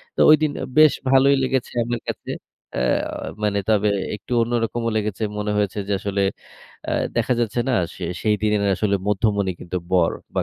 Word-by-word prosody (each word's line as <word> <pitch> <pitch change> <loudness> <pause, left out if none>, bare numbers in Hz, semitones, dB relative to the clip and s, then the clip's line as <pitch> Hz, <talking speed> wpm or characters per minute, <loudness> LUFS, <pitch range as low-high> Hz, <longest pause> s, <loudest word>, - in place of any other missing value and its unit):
তো - - -7
ঐদিন 155 -1 +5
আ - - -2
বেশ 155 -1 +7 0.2
ভালোই 135 +1 +5
লেগেছে 130 -1 -1
আমার 120 0 -3
কাছে। - - -5 0.4
অ্যা 65 - 0 0.6
মানে 100 -1 +1
তবে 105 -1 +3 0.3
একটু 105 - -14
অন্যরকমও 115 0 -1
লেগেছে 105 0 -2
মনে 105 0 -1
হয়েছে 105 0 0
যে 100 - 0
আসলে 100 0 -1 0.7
অ্যা - - -1 0.2
দেখা - - +2
যাচ্ছে 120 0 0
না - - +1 0.2
সে 90 - -6 0.2
সেইদিনের 105 -1 +1
আসলে 100 -2 +1
মধ্যমণি 100 -1 +1
কিন্তু 90 +1 -5 0.2
বর 85 -3 +3 0.2
বা - - +1
105 Hz, 165 wpm, -22 LUFS, 100-120 Hz, 0.7 s, বেশ